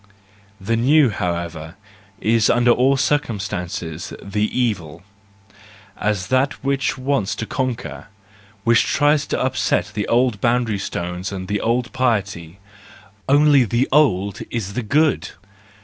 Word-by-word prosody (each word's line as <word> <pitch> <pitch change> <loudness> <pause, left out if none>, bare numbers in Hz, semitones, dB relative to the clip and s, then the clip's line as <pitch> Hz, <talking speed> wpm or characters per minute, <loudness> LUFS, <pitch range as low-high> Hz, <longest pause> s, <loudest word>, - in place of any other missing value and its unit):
The 100 +4 -1
new, 135 +2 +4
however, 85 -3 -4 0.4
is 110 0 +2
under 120 0 +4
all 130 +3 +3
circum¬ 140 -6 0
stances 90 -4 -5
the 105 +2 -2
evil, 95 -11 -2 0.9
as 105 -3 -2
that 130 +2 +2
which 135 -1 0
wants 130 -6 -1
to 115 - -4
conquer, 115 - -4 0.6
which 115 +1 +4
tries 145 0 +2
to - - -2
upset 130 -4 0
the 105 -1 -2
old 120 -3 +1
boundary 115 -4 +1
stones 90 0 -4
and 95 -2 -6
the 105 +1 -1
old 120 +1 -1
piety; 100 -9 -1 0.7
only 145 -1 +5
the 120 +3 0
old 100 -10 +2
is 105 -4 -4
the 125 - -2
good! 145 +6 +1
115 Hz, 130 wpm, -20 LUFS, 95-130 Hz, 0.9 s, only